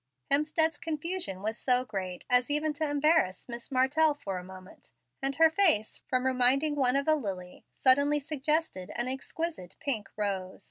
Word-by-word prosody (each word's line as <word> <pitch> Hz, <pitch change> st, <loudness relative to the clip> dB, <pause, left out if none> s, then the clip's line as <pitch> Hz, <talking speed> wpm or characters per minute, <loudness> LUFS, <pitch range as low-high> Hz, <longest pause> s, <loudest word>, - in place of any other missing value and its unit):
Hemstead's 305 Hz, +2 st, +2 dB
confusion 320 Hz, -, -3 dB
was 220 Hz, +2 st, -3 dB
so 250 Hz, -1 st, +2 dB
great 190 Hz, -5 st, -5 dB
as 250 Hz, +1 st, +3 dB
even 300 Hz, +1 st, +2 dB
to 305 Hz, 0 st, -2 dB
embarrass 290 Hz, -, +1 dB
Miss 240 Hz, +2 st, -8 dB
Martell 290 Hz, +4 st, +2 dB
for 195 Hz, -9 st, -5 dB
a -, -, -10 dB
moment, 185 Hz, 0 st, -14 dB, 0.3 s
and 270 Hz, 0 st, -1 dB
her 320 Hz, 0 st, +5 dB
face, 320 Hz, -, +2 dB
from 255 Hz, 0 st, 0 dB
reminding 260 Hz, +4 st, +2 dB
one 265 Hz, -3 st, +1 dB
of 280 Hz, +1 st, 0 dB
a 310 Hz, -, +5 dB
lily, 190 Hz, -10 st, -5 dB
suddenly 285 Hz, +3 st, +4 dB
suggested 300 Hz, -, -2 dB
an 240 Hz, +1 st, -1 dB
exquisite 270 Hz, -, -5 dB
pink 245 Hz, -9 st, -2 dB
rose. 195 Hz, -3 st, -3 dB
265 Hz, 165 wpm, -29 LUFS, 210-305 Hz, 0.3 s, her